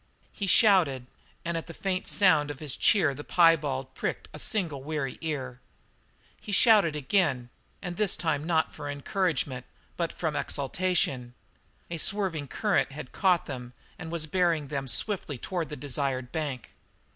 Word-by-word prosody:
He 200 Hz, -, -4 dB
shouted, 180 Hz, -, +5 dB, 0.4 s
and 170 Hz, 0 st, -1 dB
at 165 Hz, -, -3 dB
the 165 Hz, -, -9 dB
faint 190 Hz, -1 st, -2 dB
sound 160 Hz, -8 st, +4 dB
of 145 Hz, -, -5 dB
his 145 Hz, -2 st, -3 dB
cheer 165 Hz, -9 st, +4 dB
the 145 Hz, -, -8 dB
piebald 150 Hz, -7 st, +3 dB
pricked -, -, -3 dB
a 150 Hz, -, -8 dB
single 165 Hz, -10 st, -2 dB
weary 145 Hz, -2 st, -3 dB
ear. 130 Hz, -6 st, -4 dB, 0.8 s
He -, -, -8 dB
shouted 205 Hz, -7 st, +5 dB
again, 135 Hz, -5 st, +1 dB, 0.3 s
and 175 Hz, -2 st, -4 dB
this 210 Hz, -4 st, +1 dB
time 155 Hz, -4 st, 0 dB
not 160 Hz, -1 st, +1 dB
for 145 Hz, -1 st, -6 dB
encouragement, 145 Hz, -, -1 dB, 0.3 s
but 170 Hz, -1 st, -1 dB
from 160 Hz, -3 st, -2 dB
exultation; 140 Hz, -6 st, -1 dB, 0.6 s
a 170 Hz, -, -3 dB
swerving 180 Hz, -6 st, 0 dB
current 205 Hz, 0 st, +1 dB
had 145 Hz, -3 st, -8 dB
caught 180 Hz, -3 st, +2 dB
them 125 Hz, -3 st, -7 dB, 0.3 s
and 160 Hz, -, -6 dB
was 170 Hz, -2 st, -1 dB
bearing 165 Hz, -3 st, +1 dB
them 140 Hz, -2 st, -3 dB
swiftly 165 Hz, -, -1 dB
toward 170 Hz, +5 st, -3 dB
the 150 Hz, -, -5 dB
desired 135 Hz, -3 st, -2 dB
bank. 145 Hz, -6 st, -4 dB
155 Hz, 155 wpm, -28 LUFS, 135-180 Hz, 0.8 s, shouted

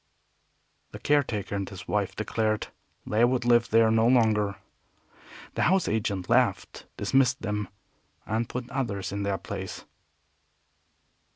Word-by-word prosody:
The -, -, -6 dB
caretaker 125 Hz, -10 st, 0 dB
and 100 Hz, -1 st, -2 dB
his 95 Hz, -2 st, -10 dB
wife 100 Hz, -2 st, -1 dB
declared 110 Hz, 0 st, -1 dB, 0.4 s
they 110 Hz, +2 st, +1 dB
would 120 Hz, 0 st, +2 dB
live 120 Hz, -1 st, +4 dB
there 115 Hz, 0 st, +4 dB
no 115 Hz, +1 st, +3 dB
longer. 110 Hz, -5 st, +3 dB, 1.0 s
The -, -, -2 dB
house 190 Hz, 0 st, +3 dB
agent 100 Hz, -4 st, -1 dB
laughed, -, -, +1 dB
dismissed 135 Hz, 0 st, +2 dB
them, 105 Hz, -2 st, -2 dB, 0.6 s
and 110 Hz, +1 st, -2 dB
put 125 Hz, -1 st, -5 dB
others 115 Hz, -8 st, -3 dB
in 100 Hz, +1 st, -3 dB
their 100 Hz, -1 st, -1 dB
place. -, -, -7 dB
110 Hz, 125 wpm, -27 LUFS, 100-120 Hz, 1.0 s, live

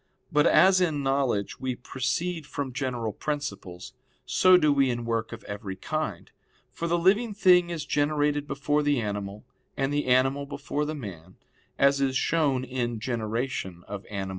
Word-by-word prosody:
But 150 Hz, -2 st, +4 dB
as 190 Hz, 0 st, +5 dB
in 155 Hz, -5 st, 0 dB
knowledge 135 Hz, -7 st, 0 dB
we 130 Hz, -1 st, -2 dB
proceed 150 Hz, +6 st, -3 dB
from 140 Hz, -4 st, -4 dB
general 125 Hz, -5 st, -2 dB
principles, 130 Hz, -10 st, -5 dB, 0.3 s
so 185 Hz, 0 st, +5 dB
do 150 Hz, -4 st, +3 dB
we 135 Hz, -2 st, +3 dB
in 120 Hz, -1 st, -2 dB
work 115 Hz, -1 st, -2 dB
of 115 Hz, -1 st, -8 dB
every 100 Hz, -1 st, -6 dB
kind. -, -, -4 dB, 0.4 s
For 170 Hz, -, -4 dB
the 170 Hz, +1 st, +2 dB
living 205 Hz, +5 st, +2 dB
thing 180 Hz, -3 st, +5 dB
is 165 Hz, -4 st, -4 dB
generated 145 Hz, 0 st, 0 dB
before 145 Hz, +2 st, 0 dB
the 145 Hz, -3 st, +1 dB
animal, 105 Hz, -1 st, -4 dB, 0.3 s
and 135 Hz, +1 st, 0 dB
the 145 Hz, -2 st, -1 dB
animal 135 Hz, +3 st, +2 dB
before 145 Hz, +1 st, -3 dB
the 155 Hz, +1 st, -3 dB
man, 95 Hz, -, -9 dB, 0.4 s
as 140 Hz, 0 st, +3 dB
is 135 Hz, -1 st, +1 dB
shown 145 Hz, -5 st, +1 dB
in 120 Hz, -3 st, -3 dB
_De 120 Hz, +1 st, -2 dB
Gener. 105 Hz, -4 st, -4 dB
Anim. 100 Hz, -2 st, -4 dB
135 Hz, 165 wpm, -27 LUFS, 115-150 Hz, 0.4 s, as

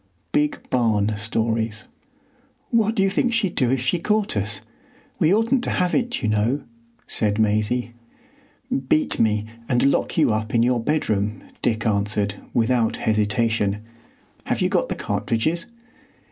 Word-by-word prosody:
—Big 150 Hz, 0 st, 0 dB
Barn 110 Hz, -4 st, +2 dB
Stories. 110 Hz, +1 st, -1 dB, 0.9 s
"What 225 Hz, -1 st, +2 dB
do 195 Hz, -, +3 dB
you 195 Hz, -, +3 dB
think 240 Hz, +4 st, +1 dB
she'd 220 Hz, -6 st, +1 dB
do 125 Hz, -4 st, +1 dB
if 130 Hz, -1 st, +1 dB
she 130 Hz, +7 st, +1 dB
caught 210 Hz, -, 0 dB
us? 105 Hz, 0 st, -2 dB, 0.6 s
We 160 Hz, -, +4 dB
oughtn't 230 Hz, +5 st, +2 dB
to -, -, -1 dB
have 180 Hz, -1 st, 0 dB
it, 245 Hz, -2 st, 0 dB
you -, -, +1 dB
know," 110 Hz, +6 st, +1 dB, 0.4 s
said 105 Hz, -2 st, 0 dB
Maisie. 110 Hz, +3 st, +1 dB, 1.0 s
"Beat 155 Hz, -, +2 dB
me, 105 Hz, -1 st, +2 dB, 0.2 s
and 130 Hz, +2 st, +3 dB
lock -, -, -1 dB
you 155 Hz, -9 st, +4 dB
up 110 Hz, +1 st, -2 dB
in 115 Hz, -, +4 dB
your 125 Hz, 0 st, +2 dB
bedroom," 110 Hz, -8 st, 0 dB, 0.2 s
Dick 110 Hz, 0 st, 0 dB
answered, 105 Hz, -1 st, +1 dB, 0.2 s
without 120 Hz, -1 st, +1 dB
hesitation. 110 Hz, -1 st, 0 dB, 0.6 s
"Have -, -, -1 dB
you -, -, +2 dB
got -, -, +1 dB
the -, -, -2 dB
cartridges?" 115 Hz, -, -1 dB
115 Hz, 145 wpm, -23 LUFS, 105-155 Hz, 1.0 s, We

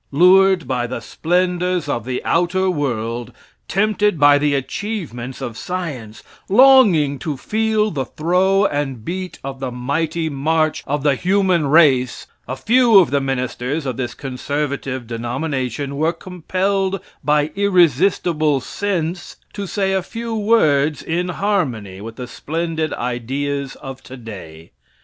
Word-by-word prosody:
Lured 185 Hz, +3 st, +5 dB
by 125 Hz, -2 st, -1 dB
the 120 Hz, -, -4 dB
splendors 180 Hz, -, -1 dB
of 120 Hz, -5 st, -2 dB
the 125 Hz, 0 st, -3 dB
outer 185 Hz, +2 st, +1 dB
world, 120 Hz, -6 st, -3 dB, 0.4 s
tempted 210 Hz, -2 st, +1 dB
by 145 Hz, 0 st, +6 dB
the 145 Hz, -1 st, +1 dB
achievements 135 Hz, -, -4 dB
of 115 Hz, -, -5 dB
science, 140 Hz, -11 st, -5 dB, 0.3 s
longing 200 Hz, -, +5 dB
to 150 Hz, -5 st, -4 dB
feel 215 Hz, +5 st, 0 dB
the 135 Hz, -4 st, -2 dB
throw 185 Hz, +7 st, +2 dB
and 135 Hz, -, -2 dB
beat 185 Hz, +1 st, -5 dB
of 135 Hz, 0 st, -6 dB
the 135 Hz, -1 st, -3 dB
mighty 155 Hz, +6 st, -2 dB
march 155 Hz, +2 st, 0 dB
of 145 Hz, 0 st, -1 dB
the 145 Hz, -2 st, +4 dB
human 185 Hz, 0 st, +1 dB
race, 135 Hz, -5 st, +3 dB, 0.2 s
a 130 Hz, -, -3 dB
few 235 Hz, -, +4 dB
of 185 Hz, -, +5 dB
the 140 Hz, 0 st, +2 dB
ministers 135 Hz, +2 st, -2 dB
of 130 Hz, -2 st, -2 dB
this 125 Hz, -1 st, -4 dB
conservative 135 Hz, -1 st, -3 dB
denomination 130 Hz, +3 st, -3 dB
were 160 Hz, +4 st, +1 dB
compelled 190 Hz, +3 st, -2 dB, 0.2 s
by 150 Hz, +1 st, +2 dB
irresistible 175 Hz, -5 st, +2 dB
sense, 175 Hz, +4 st, -3 dB, 0.2 s
to 200 Hz, -1 st, -5 dB
say 195 Hz, 0 st, -1 dB
a 190 Hz, -, +1 dB
few 230 Hz, +4 st, -6 dB
words 155 Hz, -10 st, +2 dB
in 175 Hz, +2 st, -2 dB
harmony 130 Hz, -, -2 dB
with 115 Hz, +1 st, -8 dB
the 125 Hz, -, -6 dB
splendid 160 Hz, +4 st, -3 dB
ideas 135 Hz, +3 st, -3 dB
of 135 Hz, -1 st, -9 dB
today. 100 Hz, -12 st, -10 dB
150 Hz, 135 wpm, -19 LUFS, 130-185 Hz, 0.4 s, by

